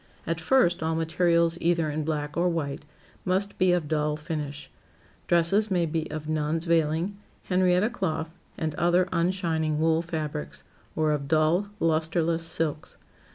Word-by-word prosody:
At 165 Hz, 0 st, -2 dB
first, 175 Hz, -5 st, +3 dB
all 160 Hz, 0 st, 0 dB
materials 170 Hz, +1 st, +2 dB
either 170 Hz, -2 st, +1 dB
in 155 Hz, +1 st, -2 dB
black 150 Hz, -1 st, -3 dB
or 175 Hz, +1 st, +2 dB
white, 145 Hz, -4 st, -3 dB, 0.4 s
must 190 Hz, +2 st, -1 dB
be 185 Hz, -1 st, +4 dB
of 175 Hz, -4 st, +1 dB
dull 150 Hz, 0 st, 0 dB
finish. 150 Hz, -3 st, -5 dB, 0.6 s
Dresses 175 Hz, +6 st, +3 dB
may 180 Hz, -3 st, +2 dB
be 160 Hz, 0 st, -2 dB
of 155 Hz, 0 st, -6 dB
nun's 155 Hz, +1 st, -1 dB
veiling, 165 Hz, +3 st, +1 dB, 0.3 s
Henrietta 185 Hz, +3 st, +2 dB
cloth, 160 Hz, -8 st, -2 dB, 0.3 s
and 160 Hz, -2 st, -2 dB
other 175 Hz, +2 st, +3 dB
unshining 170 Hz, -3 st, 0 dB
wool 160 Hz, +1 st, +2 dB
fabrics, 155 Hz, -3 st, -5 dB, 0.3 s
or 155 Hz, -1 st, +2 dB
of 145 Hz, -2 st, -2 dB
dull, 160 Hz, +6 st, +2 dB
lusterless 165 Hz, +1 st, +1 dB
silks. 160 Hz, -2 st, -2 dB
165 Hz, 145 wpm, -26 LUFS, 155-175 Hz, 0.6 s, be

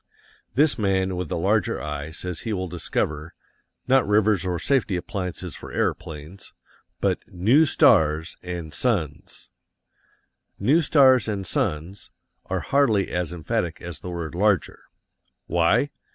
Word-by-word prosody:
This 145 Hz, -1 st, +3 dB
man 95 Hz, -2 st, +1 dB
with 90 Hz, -3 st, -4 dB
the -, -, -2 dB
larger -, -, +1 dB
eye 75 Hz, 0 st, -5 dB
says 85 Hz, +1 st, -5 dB
he 110 Hz, -, -3 dB
will 95 Hz, -2 st, -2 dB
discover, 80 Hz, -2 st, -3 dB, 0.5 s
not 130 Hz, -2 st, +4 dB
rivers 105 Hz, -2 st, +3 dB
or 90 Hz, -1 st, -1 dB
safety 125 Hz, -4 st, +1 dB
appliances 90 Hz, -2 st, -4 dB
for -, -, -10 dB
aeroplanes, 85 Hz, +1 st, -4 dB, 0.5 s
but -, -, +1 dB
NEW 115 Hz, -, +3 dB
STARS 80 Hz, -, +3 dB
and 85 Hz, -4 st, -6 dB
SUNS. 80 Hz, -, -2 dB, 1.1 s
"New 155 Hz, +7 st, +3 dB
stars 135 Hz, -6 st, +5 dB
and 100 Hz, -3 st, -3 dB
suns" 95 Hz, -, -2 dB, 0.4 s
are -, -, -2 dB
hardly 120 Hz, -8 st, +2 dB
as 90 Hz, -2 st, -2 dB
emphatic 85 Hz, 0 st, -2 dB
as 85 Hz, -2 st, -7 dB
the 90 Hz, -, -7 dB
word 85 Hz, -2 st, -5 dB
"larger." 95 Hz, -1 st, +1 dB, 0.7 s
Why? 85 Hz, +12 st, +2 dB
90 Hz, 130 wpm, -24 LUFS, 85-110 Hz, 1.1 s, stars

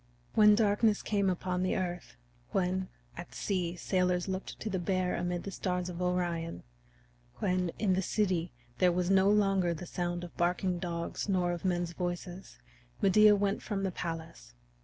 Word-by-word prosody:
When 210 Hz, -1 st, +7 dB
darkness 210 Hz, 0 st, +2 dB
came 200 Hz, -2 st, +1 dB
upon 180 Hz, 0 st, -1 dB
the 185 Hz, -, +1 dB
earth; 175 Hz, -, -4 dB, 0.3 s
when, 185 Hz, 0 st, 0 dB, 0.3 s
at -, -, -9 dB
sea, 180 Hz, -3 st, -1 dB
sailors 180 Hz, 0 st, 0 dB
looked 190 Hz, 0 st, -4 dB
to -, -, -5 dB
the 190 Hz, -3 st, -1 dB
Bear 185 Hz, 0 st, 0 dB
arid 175 Hz, 0 st, -2 dB
the 200 Hz, -, -5 dB
stars 180 Hz, -1 st, -2 dB
of 175 Hz, 0 st, -6 dB
Orion; 175 Hz, -2 st, -1 dB, 0.7 s
when, 180 Hz, -1 st, 0 dB
in 200 Hz, -4 st, +2 dB
the 190 Hz, -, +1 dB
city, 185 Hz, -4 st, 0 dB, 0.3 s
there 180 Hz, -1 st, +5 dB
was 180 Hz, +1 st, 0 dB
no 195 Hz, 0 st, +5 dB
longer 195 Hz, -4 st, +3 dB
the 170 Hz, -, -7 dB
sound 175 Hz, 0 st, -3 dB
of 175 Hz, -, -9 dB
barking 180 Hz, +1 st, +1 dB
dogs 170 Hz, +2 st, -3 dB
nor 180 Hz, -2 st, +2 dB
of 175 Hz, -1 st, -4 dB
men's 175 Hz, -2 st, 0 dB
voices, 175 Hz, +1 st, -5 dB, 0.4 s
Medea 210 Hz, +2 st, +6 dB
went 200 Hz, 0 st, 0 dB
from 200 Hz, -3 st, -3 dB
the 190 Hz, -, 0 dB
palace. 160 Hz, -, -6 dB
180 Hz, 165 wpm, -31 LUFS, 175-195 Hz, 0.7 s, When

